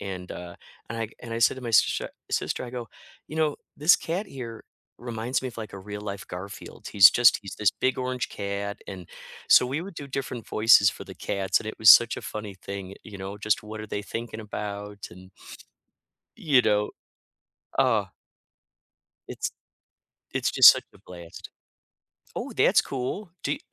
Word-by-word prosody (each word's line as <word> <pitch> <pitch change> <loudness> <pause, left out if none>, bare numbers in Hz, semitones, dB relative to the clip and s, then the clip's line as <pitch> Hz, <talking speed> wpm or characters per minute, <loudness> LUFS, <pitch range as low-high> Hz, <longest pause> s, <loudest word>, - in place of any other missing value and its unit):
and, 95 -2 -6
uh 90 -1 -8 0.3
and 115 - -4
I 115 - -2
and 115 -2 -7
I 115 - -2
said 115 - +4
to 130 - -9
my 120 - -4
sister 110 - +3 0.2
sister, - - -1
I 120 - -8
go, 120 -2 -6 0.4
"You 155 - -7
know, 155 -2 +1 0.2
this 155 +4 +6
cat 180 +6 -3
here 120 -9 -8 0.3
reminds 120 +1 -3
me 130 - -3
of, 115 - -12
like, 110 -3 -7
a 100 - -7
real 105 +2 -8
life 100 -2 -6
Garfield." 100 +3 -8
He's 95 -2 +9
just 120 -1 +5
he's 100 -3 -8
this 105 -3 +4
big 130 - -1
orange 125 0 -2
cat, 100 0 -4
and 90 -3 -9 0.4
So, - - +7
we 140 +5 -2
would 190 +2 -8
do 145 -3 -7
different 130 -4 -5
voices 110 -2 +6
for - - -10
the - - -10
cats, 95 -1 0
and - - -9
it 110 - -6
was 110 - +4
such 120 0 +7
a - - -10
funny 105 -2 -6
thing, 95 0 -7
you 100 - -11 0.2
you 100 - -8
know, 95 +2 -7
just 105 -1 0
what 110 +1 -8
are 110 - -7
they 105 -1 -4
thinking 115 +1 -6
about, 105 -1 -6
and 95 +2 -14 1.1
you 140 -6 +3
know 105 -1 +1 0.9
uh - - +3 1.2
it's - - -3 0.8
it's - - 0
just - - +10
such - - +3
a - - -17
blast. 85 -2 -11 0.9
Oh, - - -4
that's - - +4
cool. 150 +9 -5
Do 140 - 0
y - - -3
110 Hz, 185 wpm, -26 LUFS, 100-125 Hz, 1.2 s, just